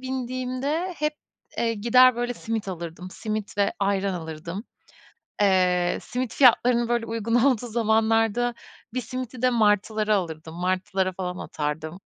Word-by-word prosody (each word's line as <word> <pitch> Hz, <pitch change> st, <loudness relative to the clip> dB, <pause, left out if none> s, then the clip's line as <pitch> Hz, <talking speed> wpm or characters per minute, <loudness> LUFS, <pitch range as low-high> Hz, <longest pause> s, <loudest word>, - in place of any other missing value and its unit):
bindiğimde 260 Hz, +6 st, -3 dB
hep, 300 Hz, 0 st, -1 dB, 0.4 s
eee, 230 Hz, -1 st, +1 dB
gider, 240 Hz, +3 st, +5 dB
böyle, 245 Hz, 0 st, -2 dB
simit 225 Hz, -3 st, -4 dB
alırdım, 170 Hz, 0 st, -6 dB
simit 215 Hz, 0 st, -5 dB
ve 200 Hz, -, +2 dB
ayran 200 Hz, -1 st, 0 dB
alırdım. 170 Hz, +5 st, -6 dB, 0.8 s
Eee, 180 Hz, -3 st, +3 dB
simit 250 Hz, -1 st, -4 dB
fiyatlarını, 240 Hz, -2 st, +4 dB
böyle, 240 Hz, -1 st, +1 dB
uygun 230 Hz, 0 st, -1 dB
olduğu 245 Hz, -1 st, +3 dB
zamanlarda 225 Hz, +1 st, +2 dB, 0.4 s
bir 255 Hz, -, -1 dB
simidi 255 Hz, -1 st, -6 dB
de 255 Hz, -, +4 dB
martılara 215 Hz, -1 st, +2 dB
alırdım, 160 Hz, -3 st, -4 dB
martılara 185 Hz, +2 st, 0 dB
falan 180 Hz, -1 st, -4 dB
atardım. 155 Hz, +3 st, -4 dB
220 Hz, 130 wpm, -25 LUFS, 185-245 Hz, 0.8 s, gider